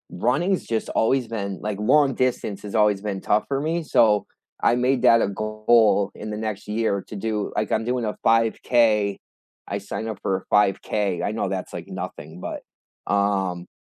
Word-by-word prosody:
runnings 170 - +1
just 115 -1 -2
always 125 +2 +1
been 100 -4 -4
like, 105 -1 -3
long 135 +5 +4
distance 120 -6 -1
has 105 +1 -7
always 105 -2 +3
been 100 -2 -4
tough 105 - +1
for 135 -1 -1
me, 165 +3 -1
so, 105 -8 +3 0.4
I - - +4
made 125 +1 +1
that 115 0 +6
a - - +2
goal 110 0 +2
in 110 - -7
the 105 - -4
next 110 -2 -4
year 105 -2 0
to - - -7
do 105 0 -2
like 105 - -1
I'm 110 - +1
doing 125 0 -1
a 105 - -3
5K, 115 -2 +2 0.5
I - - -2
signed 110 - -5
up 110 -3 -5
for 95 - 0
a 95 - -11
5K, 100 -2 +1
I 100 - 0
know 110 -3 -2
that's, 95 -1 -4
like, - - -7
nothing, 80 +4 -7
but - - -5 0.5
um 95 -3 0
105 Hz, 185 wpm, -23 LUFS, 100-115 Hz, 0.5 s, that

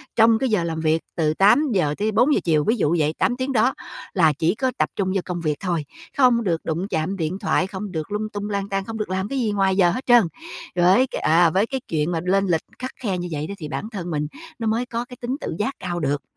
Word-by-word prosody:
trong 225 0 +5
cái 265 - 0
giờ 210 -6 +2
làm 165 -1 -3
việc 160 0 +1
từ 155 -3 +1
8:00 195 - +3
tới 215 +2 0
4:00 260 +7 +3
chiều, 155 -3 +2
ví 220 - +2
dụ 170 -5 +2
vậy, 155 0 +1
8 245 - +1
tiếng 260 +1 -2
đó, 240 +3 +3 0.4
là 160 -5 +4
chỉ 160 +6 0
có 255 +3 0
tập - - +1
trung 190 -2 0
vô 195 - +1
công 175 -2 -4
việc 155 -2 0
thôi, 170 -6 -2 0.3
không 250 -4 +4
được 170 -4 0
đụng 170 +5 -2
chạm 175 +1 -2
điện 170 +2 -2
thoại, 185 - +1
không 195 0 -6
được 160 -1 -4
lung 215 +1 -2
tung 205 0 -5
lang 200 -1 -2
tang, 195 0 -1
không 225 +1 -5
được 215 -3 -3
làm 190 +1 -1
cái 270 +4 -2
gì 225 -4 0
ngoài 195 -2 +2
giờ 175 -3 +5
hết 255 +8 -4
trơn. 240 -2 +6 0.5
Với 185 +9 +4
cái, - - -5
à, 165 +2 +5
với 190 +6 +2
cái 265 -1 -3
chuyện 155 +1 0
mà 165 - 0
lên 195 +2 +2
lịch 165 -3 +1 0.2
khắt 255 +1 -4
khe 200 -7 -2
như 175 0 -4
vậy 150 0 -3
đó 200 - -5
thì 155 - -6
bản 215 - -4
thân 180 -6 -5
mình 150 -1 -1 0.3
nó 225 - -2
mới 225 +3 +1
có 235 0 -4
cái 250 0 -12
tính 245 +2 -2
tự - - -4
giác 265 +6 0
cao 175 -1 -3
được. 145 -2 -1
195 Hz, 270 wpm, -22 LUFS, 165-225 Hz, 0.5 s, trơn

